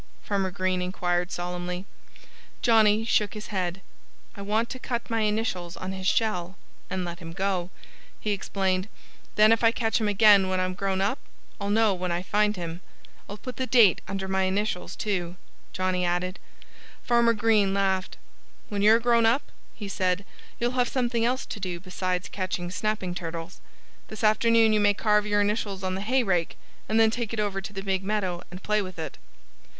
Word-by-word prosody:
Farmer 195 -2 0
Green 185 0 -1
inquired 180 0 -1
solemnly. 180 +1 -4 0.8
Johnnie 220 -2 +4
shook 210 -2 +1
his 210 - -7
head. 185 -1 -2 0.5
"I 200 - -8
want 215 +3 0
to 255 - -6
cut 235 -2 -4
my 225 - +1
initials 210 -5 -1
on 185 - -5
his 190 0 -4
shell 190 -5 0 0.3
and 185 -1 -2
let 170 -1 -6
him 165 -2 -8
go," 190 -1 -1 0.5
he 210 - -2
explained. 190 -1 -1 0.5
"Then 215 +1 +6
if 225 +1 +3
I 230 - +6
catch 225 -1 0
him 215 - +1
again 205 -2 +6
when 185 0 0
I'm 185 0 -1
grown 190 0 -1
up 200 +7 0 0.4
I'll 200 0 -3
know 215 0 +3
him 185 - -6
when 180 -1 -2
I 175 +1 -1
find 210 +2 +1
him.... 170 -1 -6 0.5
I'll 205 - -6
put 255 +3 -8
the 260 - -2
date 225 -9 +5
under 195 0 -3
my 190 0 +1
initials, 190 -1 -2
too," 180 -4 -2 0.4
Johnnie 185 -1 -1
added. 180 +1 -1 0.6
Farmer 235 -1 +4
Green 215 -3 +3
laughed. 190 -1 0 0.5
"When 205 -1 -2
you're 220 +2 +6
grown 235 -1 +3
up," 240 +5 +1 0.2
he 210 - -6
said, 185 0 0 0.3
"you'll 240 +1 +1
have 250 -1 +1
something 240 -3 0
else 255 +2 0
to - - -7
do 180 -3 -4
besides 185 0 -3
catching 185 -2 -3
snapping 205 -2 -2
turtles. 165 0 -6 0.5
This 215 - -8
afternoon 225 +1 +4
you 215 - +3
may 205 0 +3
carve 210 0 +2
your 205 0 +2
initials 205 -2 -1
on 185 0 -1
the 190 - -3
hay 255 +5 +2
rake 180 -6 0 0.3
and 220 +1 +3
then 220 -1 +5
take 230 -1 -3
it 225 - -2
over 200 -2 -1
to 195 - -7
the 195 -1 -6
big 190 -1 -1
meadow 190 -4 -1
and 180 +2 -10
play 210 0 +1
with 185 -3 -7
it." 160 - -6
195 Hz, 185 wpm, -26 LUFS, 185-215 Hz, 0.8 s, Then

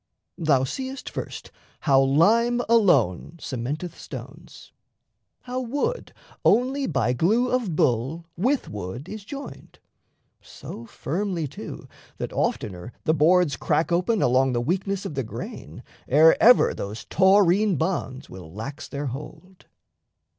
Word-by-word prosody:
Thou 145 -6 +3
seest, 265 - -5
first, - - -7 0.3
How 135 -2 +4
lime 220 - +3
alone 170 - +3
cementeth 150 +8 -4
stones: - - -10 0.7
how 250 0 -4
wood 290 - -2 0.3
Only 265 +3 +2
by 125 -5 +1
glue 220 - +2
of 235 -10 0
bull 135 +7 0
with 255 +10 0
wood 105 - -6
is 215 0 -7
joined 280 +6 -9 0.6
So 115 - -10
firmly 175 - -3
too - - -9 0.3
that - - -5
oftener 95 +3 -2
the 155 - +2
boards 165 -1 +3
Crack 165 +5 0
open 185 +5 +1
along 130 +1 +3
the 120 - +1
weakness 190 +7 -2
of - - -4
the 135 - -1
grain 110 - -8 0.2
Ere 155 +4 +6
ever 245 +2 +6
those 105 +3 -6
taurine 195 +1 +4
bonds 155 -5 -2
will 90 -4 -11
lax 125 - -7
their 145 0 -5
hold. 150 +8 -9
165 Hz, 125 wpm, -24 LUFS, 130-210 Hz, 0.7 s, Ere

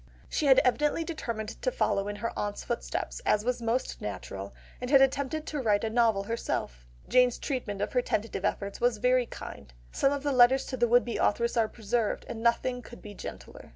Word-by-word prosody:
She 300 - 0
had 265 -1 +7
evidently 295 +5 +2
determined 235 -10 -5
to - - +1
follow 200 - 0
in 205 - -3
her 230 +3 -3
aunt's 205 0 -3
footsteps, - - -3
as 210 +1 +2
was 250 -1 0
most 230 +3 -1
natural, 100 -1 -6 0.3
and 250 - -3
had 275 -1 +7
attempted 280 +3 +1
to 300 - -3
write 210 -3 +2
a 220 - -1
novel 225 -4 +3
herself; - - -3 0.2
Jane's 250 -1 +4
treatment 225 -8 -3
of - - -4
her 250 - +3
tentative 215 -4 -2
efforts 200 0 -2
was 240 -2 +2
very 250 +2 +2
kind, 70 -4 -9 0.2
some 275 - +2
of 285 -1 -2
the 290 - +1
letters 260 +1 +5
to 260 - -4
the 240 0 +3
would 245 +1 +4
be 235 - -3
authoress 235 +3 +1
are 225 -2 +3
preserved, 220 0 -2
and 225 - -6
nothing 245 +2 +1
could 240 - -13
be 210 - -8
gentler. - - -9
235 Hz, 205 wpm, -29 LUFS, 210-255 Hz, 0.3 s, had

